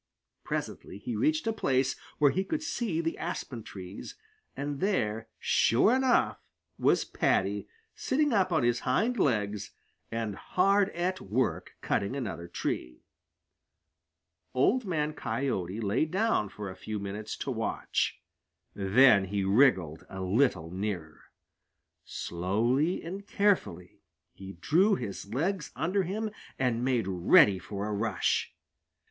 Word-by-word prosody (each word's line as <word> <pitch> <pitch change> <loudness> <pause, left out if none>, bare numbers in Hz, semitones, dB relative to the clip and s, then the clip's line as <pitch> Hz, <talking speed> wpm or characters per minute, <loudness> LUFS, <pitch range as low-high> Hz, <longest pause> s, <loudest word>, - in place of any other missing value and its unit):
Presently - - -4
he - - -5
reached 310 -2 +1
a 225 - +1
place 135 -9 +1 0.2
where 145 -2 +5
he 190 - 0
could 315 +9 -3
see 230 - -1
the 165 0 -3
aspen 140 -8 -4
trees, 95 -3 -9 0.4
and 145 0 -3
there 115 - 0
sure 165 - +3
enough 260 -1 +2 0.4
was - - +3
Paddy, - - 0 0.3
sitting 290 0 +1
up 190 -3 +2
on 160 - +2
his 120 0 +2
hind 220 - +1
legs 105 - 0 0.4
and 115 -2 -2
hard 195 - +2
at 185 +2 -1
work 120 +6 -1
cutting 100 +6 -1
another 110 -10 -4
tree. 60 -6 -4 1.5
Old 225 - +3
Man 155 -5 -1
Coyote 110 - -2
lay 110 +6 +1
down 190 - +1
for 105 +1 -7
a - - -10
few 110 +2 -5
minutes 105 +2 -5
to 135 - -3
watch. 115 -2 -1 0.5
Then 100 +1 +5
he 100 +1 -2
wriggled 95 - +3
a 95 - -6
little 95 - +1
nearer. 90 -5 -4 0.8
Slowly 115 - 0
and 195 +4 -7
carefully 180 - 0 0.3
he 95 0 -9
drew 175 - +3
his 100 - -6
legs 165 - -1
under 190 +4 +1
him 210 +4 -3 0.3
and 125 -2 0
made 125 -6 +1
ready 95 +1 +5
for 100 +2 -5
a 105 - -2
rush. 105 -1 0
125 Hz, 130 wpm, -29 LUFS, -, 1.5 s, where